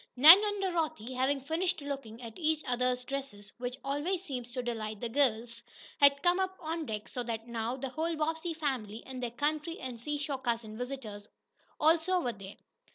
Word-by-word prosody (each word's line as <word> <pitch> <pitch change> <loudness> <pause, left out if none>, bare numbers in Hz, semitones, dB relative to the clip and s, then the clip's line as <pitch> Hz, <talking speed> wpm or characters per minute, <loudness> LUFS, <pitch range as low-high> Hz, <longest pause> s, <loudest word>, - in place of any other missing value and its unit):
Nan 320 +10 +11
and 410 -1 0
Dorothy, 315 - -1
having 265 +2 +1
finished 330 +5 -1
looking 275 -5 -6
at 230 -1 -7
each 315 -2 0
other's 250 0 0
dresses, 250 -6 -6
which 250 +1 -3
always 300 +7 -1
seems 250 -8 -5
to 250 0 -3
delight 220 -3 -3
girls, 235 -4 +1 0.4
had 280 0 +6
come 355 +1 +4
up 380 0 -1
on 325 -2 -3
deck 215 -1 -4
so 250 - -4
that 230 -1 -4
now 235 +1 -2
the 270 0 -4
whole 325 +5 -1
Bobbsey 320 +2 -1
family, 250 -8 -3
and 260 -1 -7
their 245 - -1
country, 300 +6 -2
and 250 -3 -6
seashore 290 0 -2
cousin 230 -3 -2
visitors 230 -4 -6 0.5
also, 330 +4 +4
were 245 -8 -1
there. 195 -1 -10
270 Hz, 175 wpm, -31 LUFS, 235-315 Hz, 0.5 s, Nan